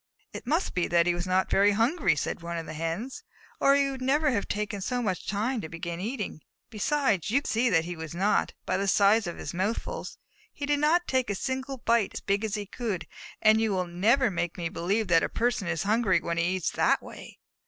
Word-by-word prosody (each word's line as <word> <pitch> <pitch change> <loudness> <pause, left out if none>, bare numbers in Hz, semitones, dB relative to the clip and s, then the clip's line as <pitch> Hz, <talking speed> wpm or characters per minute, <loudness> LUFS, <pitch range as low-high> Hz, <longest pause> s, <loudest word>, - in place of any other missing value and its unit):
"It - - -8
must 325 +6 0
be 180 - 0
that 170 -1 +3
he 175 - +2
was 175 +1 -3
not 185 +1 +2
very 205 +1 +4
hungry," 245 - +2
said - - -3
one 170 0 -4
of 165 - -4
the 155 - -7
Hens, 165 - -4 0.4
"or 275 - +5
he 280 -1 +2
would 265 -1 -7
never 290 +3 +2
have 205 -5 -1
taken 205 -1 -3
so 250 +5 -1
much 190 -7 -2
time 220 +4 -1
to 160 - -7
begin 170 +1 -5
eating. 210 - -4 0.3
Besides, 215 - 0
you 270 +6 +3
can - - -6
see 240 +3 +2
that 165 -5 +2
he 175 +1 -5
was 160 0 -7
not, 195 +4 +1
by 185 - 0
the 200 +1 -1
size 200 +1 +4
of 170 - -5
his - - -6
mouthfuls. 190 +6 -3 0.3
He 285 - -5
did 290 0 +1
not 335 +4 +3
take 260 -3 0
a 200 - 0
single 265 +4 -3
bite 235 -3 +1
as - - -4
big 200 +2 0
as 215 -1 -1
he 205 -1 -4
could, 210 -3 -4 0.4
and 220 +1 +6
you 225 - +1
will 185 -1 0
never 215 +8 +2
make 175 -1 -2
me 170 -2 -2
believe 200 +6 -1
that 165 -1 +5
a - - -1
person 230 -5 0
is 165 -2 -1
hungry 215 -1 +2
when 170 0 -2
he 170 - +2
eats 185 -1 0
in - - -13
that - - +3
way." - - -11
205 Hz, 240 wpm, -28 LUFS, 175-245 Hz, 0.4 s, and